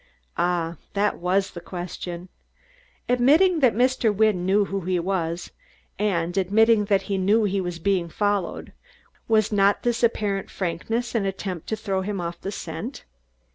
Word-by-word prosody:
Ah! 170 -1 0 0.2
That 205 +1 +1
was 190 +3 +1
the 175 - -8
question! 175 0 -6 0.8
Admitting 300 +9 +4
that 255 -7 +4
Mr. 250 -2 +2
Wynne 205 -3 +2
knew 200 +2 +3
who 195 0 -3
he 180 +1 0
was, 170 -2 -2 0.5
and 175 -4 0
admitting 210 +3 +4
that 195 -1 +2
he 195 -2 -2
knew 205 +4 +3
he 200 -1 0
was 175 -2 -4
being 180 -1 0
followed, 205 0 -2 0.5
was 215 -2 +3
not 200 -1 +3
this 240 -1 0
apparent 210 -4 0
frankness 205 +7 -3
an 220 -4 0
attempt 190 -3 -5
to 220 - -1
throw 195 -3 -2
him 200 0 -3
off 170 0 -5
the 195 - -4
scent? 185 - -6
195 Hz, 155 wpm, -24 LUFS, 180-215 Hz, 0.8 s, Admitting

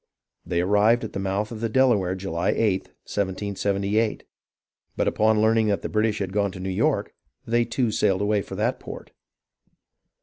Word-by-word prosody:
They 85 -1 -1
arrived 105 +5 +3
at 110 - -6
the - - -3
mouth 100 +3 -2
of 110 -2 -7
the 115 - 0
Delaware 110 -7 +3
July 90 -3 -1
8th, 100 -4 0 0.2
1778; 100 +2 -1 0.7
but - - +1
upon 110 0 +3
learning 110 0 +3
that 100 -1 0
the - - -3
British 110 0 +1
had 95 -2 -3
gone 100 -1 +1
to 95 - -9
New 95 +1 -4
York, 95 - 0 0.3
they 120 +1 +2
too 115 0 0
sailed 100 -3 +1
away 105 0 +1
for - - -8
that - - 0
port. - - -9
105 Hz, 170 wpm, -24 LUFS, 95-110 Hz, 0.7 s, arrived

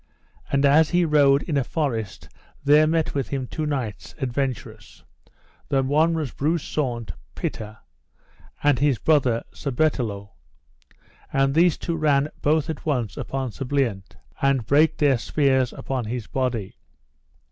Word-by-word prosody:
And 140 0 +2
as 150 +3 +5
he 175 -1 +2
rode 145 -3 +4
in 150 - -1
a 135 - +2
forest 120 - -3 0.4
there 150 +2 +5
met 160 0 0
with 140 -3 -2
him 135 -2 -3
two 155 +4 -4
knights 130 -8 -4
adventurous, 120 -4 -4 0.7
the 135 -1 +2
one 155 +5 +2
was 155 -6 -3
Breuse 155 +2 0
Saunce 120 - -3 0.2
Pité, 110 0 -5 0.9
and 145 -4 +3
his 140 -3 +2
brother, 130 -6 +2
Sir 140 - -4
Bertelot; 120 -8 -1 1.0
and 135 0 +2
these 170 +1 +4
two 170 - -3
ran 150 -2 +2
both 155 +1 +2
at 160 -3 -5
once 125 -9 -1
upon 135 -2 -4
Sir 135 - -6
Bliant, 125 -9 -1 0.3
and 135 -4 +2
brake 150 +6 +3
their 140 -5 +3
spears 130 -1 +1
upon 130 -3 -4
his 115 0 -4
body. 120 -7 -3
140 Hz, 145 wpm, -23 LUFS, 120-150 Hz, 1.0 s, as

